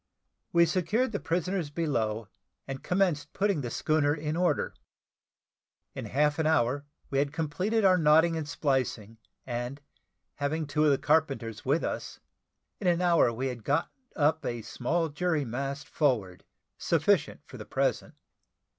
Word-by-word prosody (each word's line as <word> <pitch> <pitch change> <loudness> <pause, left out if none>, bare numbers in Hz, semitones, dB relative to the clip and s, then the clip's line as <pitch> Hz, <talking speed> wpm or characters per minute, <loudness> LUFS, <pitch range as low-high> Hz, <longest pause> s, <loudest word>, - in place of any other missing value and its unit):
We 170 0 +5
secured 205 +9 0
the 200 - -2
prisoners 180 -1 -1
below, 115 - -1 0.4
and 135 -1 -5
commenced 175 -6 0
putting 200 -6 +1
the 120 - -4
schooner 150 +3 +1
in 150 0 -3
order. 175 +1 +1 1.2
In - - -6
half 150 +2 +1
an 160 - +2
hour, 140 -2 +2 0.3
we 135 - +1
had 140 0 +1
completed 180 +8 0
our 185 -1 +5
knotting 160 +2 +5
and 155 -2 -4
splicing, 125 -7 -1 0.3
and 120 +2 -4 0.6
having 150 +2 -1
two 150 +2 +1
of - - +5
the 140 - +3
carpenters 135 -8 0
with 145 +5 +2
us, - - -4 0.6
in 195 - -2
an 175 -1 +3
hour 170 -8 +4
we 120 +3 -3
had 120 -3 -7
got 145 +7 0 0.2
up 155 0 +2
a 120 -2 -3
small 165 +10 -1
jury 155 -1 0
mast 140 +4 -4
forward, 110 - 0 0.3
sufficient - - +1
for - - -11
the - - -7
present. - - -1
150 Hz, 150 wpm, -29 LUFS, 135-170 Hz, 1.2 s, We